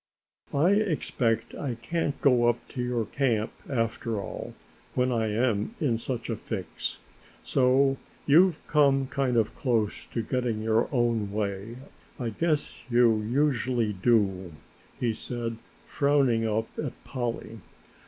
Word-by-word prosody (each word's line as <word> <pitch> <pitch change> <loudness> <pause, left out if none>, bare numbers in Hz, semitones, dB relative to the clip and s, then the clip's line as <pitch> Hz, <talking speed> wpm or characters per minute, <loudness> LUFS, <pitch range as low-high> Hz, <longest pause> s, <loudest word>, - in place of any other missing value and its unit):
"I 150 +6 +4
expect 145 - 0
I 130 -5 -3
can't 145 +5 -2
go 120 -4 +5
up 120 0 -2
to 125 - -4
your 125 -2 -1
camp, 115 -3 0 0.2
after 115 -3 -1
all, 100 - -6 0.4
when 125 0 +2
I 115 -2 +1
am 115 - 0
in 125 -9 +1
such 120 -1 -3
a 115 - -1
fix, 95 -6 -4 0.5
so 135 +1 +3 0.3
you've 165 +3 +5
come 140 -3 +3
kind 130 -2 0
of 110 -2 +2
close 115 -6 -1
to 115 - -3
getting 125 -4 -1
your 110 +1 +2
own 115 -5 +1
way. 100 +1 -3 0.4
I 120 -2 -1
guess 155 +5 -1
you, 120 -3 +4
usually 120 -2 +1
do!" 95 -4 +1 0.5
he 120 -2 +1
said, 115 0 -4 0.3
frowning 135 -6 +2
up 110 +1 -1
at 145 -5 -2
Polly. 120 -3 -4
120 Hz, 135 wpm, -27 LUFS, 110-135 Hz, 0.5 s, go